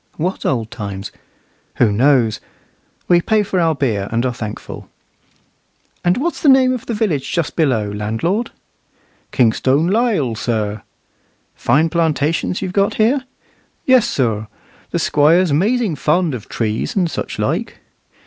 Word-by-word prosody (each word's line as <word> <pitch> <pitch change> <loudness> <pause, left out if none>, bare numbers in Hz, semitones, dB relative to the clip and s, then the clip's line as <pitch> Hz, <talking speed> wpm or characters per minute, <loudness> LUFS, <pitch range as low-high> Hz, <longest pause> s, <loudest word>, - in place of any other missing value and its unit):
What 180 +4 -2
old 115 -4 -1
times? 100 -4 -6 0.6
Who 115 -4 +3
knows? 120 -1 +3 0.7
We 175 -1 +4
pay 215 +3 +2
for 190 -2 -1
our 165 -2 +2
beer, 110 -8 -1
and 115 +2 0
are 125 - 0
thankful. 110 -3 -7 1.1
"And 175 +2 +2
what's 335 +7 -2
the 295 - +4
name 260 -1 +5
of 250 - -6
the 230 - -2
village 175 -11 -1
just 170 -3 -2
below, 130 -10 +1
landlord?" 115 - -2 0.8
"Kingstone 130 +5 +2
Lisle, 195 - +1
sir." 110 -2 -2 0.7
"Fine 160 +2 +1
plantations 165 +2 0
you've 185 -1 -4
got 200 0 +1
here?" 255 +5 +2 0.6
"Yes, 255 -3 +4
sir; 110 - -1 0.4
the - - -2
Squire's 160 +3 +3
'mazing 210 - +1
fond 155 +3 +1
of 120 -5 -7
trees 110 - -2
and 185 -4 +2
such - - -5
like." - - -2
155 Hz, 140 wpm, -18 LUFS, -, 1.1 s, name